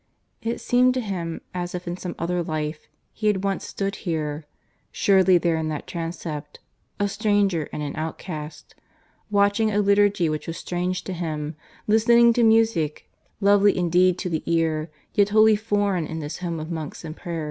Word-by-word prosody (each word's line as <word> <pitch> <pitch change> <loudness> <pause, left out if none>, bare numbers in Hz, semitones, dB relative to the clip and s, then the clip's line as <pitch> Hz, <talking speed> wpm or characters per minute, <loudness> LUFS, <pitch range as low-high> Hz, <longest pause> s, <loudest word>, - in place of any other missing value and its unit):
It 230 +1 -2
seemed 250 +1 +3
to - - +1
him 175 -6 -4
as 180 0 -4
if 180 0 -6
in 175 - -2
some 180 -1 -6
other 175 +1 -1
life 155 -1 -4 0.3
he 215 - -2
had 200 -2 +1
once 195 -1 -2
stood 195 0 -3
here 155 -4 -3 0.5
surely 190 -2 +4
there 170 -1 +1
in 160 0 -2
that 155 -2 -4
transept 165 -3 -6 0.4
a 205 - +2
stranger 200 -6 +1
and 150 - -4
an 145 - -4
outcast 155 -1 -6 0.6
watching 205 +2 +3
a 205 - -1
liturgy 200 -3 +3
which 155 -1 -3
was 165 - -4
strange 180 +1 -2
to 190 - -5
him, 155 -3 -4 0.3
listening 235 +2 +5
to 240 - +1
music, 220 -9 +2 0.3
lovely 200 0 +5
indeed 180 +1 +3
to 180 - -3
the 160 - -1
ear, 165 -1 +1 0.2
yet 205 0 +3
wholly 215 +1 +6
foreign 205 -5 0
in 160 - -5
this 150 -1 -5
home 170 -2 -3
of 155 +2 -6
monks 160 0 -6
and 155 0 -6
prayer. 170 -1 -5
180 Hz, 175 wpm, -24 LUFS, 160-205 Hz, 0.6 s, wholly